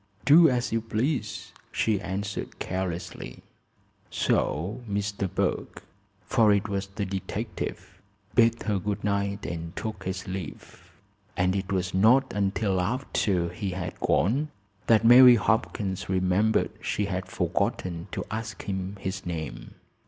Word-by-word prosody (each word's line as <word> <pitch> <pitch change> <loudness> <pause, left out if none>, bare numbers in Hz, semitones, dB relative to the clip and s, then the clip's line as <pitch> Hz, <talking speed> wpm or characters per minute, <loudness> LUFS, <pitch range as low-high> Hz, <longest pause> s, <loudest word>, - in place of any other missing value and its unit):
"Do 160 +5 +8
as 125 -2 0
you 115 0 +1
please," 120 +6 -2 0.2
she 105 -3 +1
answered 100 +2 -4
carelessly. 90 -8 -4 0.7
So 90 +11 0
Mr. 100 -2 -2
Burke, - - -2 0.4
for 115 -4 +4
it 100 +1 +2
was 100 -1 -2
the 100 +1 -4
detective, 95 0 -5 0.3
bade 115 -1 +3
her 105 -3 0
good 100 +2 -3
night 100 0 -1
and 85 0 -5
took 110 -4 -5
his 95 +1 -4
leave, 95 -1 -8 0.5
and 90 +1 +2
it 95 0 -3
was 90 -2 -1
not 120 +8 +4
until 100 -1 0
after 95 -5 0
he 95 +3 -4
had 90 -1 -5
gone 135 - +1 0.4
that 115 0 +5
Mary 125 +1 +10
Hopkins 100 -5 -1
remembered 95 +4 +2
she 105 - -1
had 95 -1 -3
forgotten 90 -2 -2
to - - -4
ask 110 -1 -5
him 95 0 -4
his 95 0 -4
name. 80 -3 -5
100 Hz, 130 wpm, -27 LUFS, 95-110 Hz, 0.7 s, Mary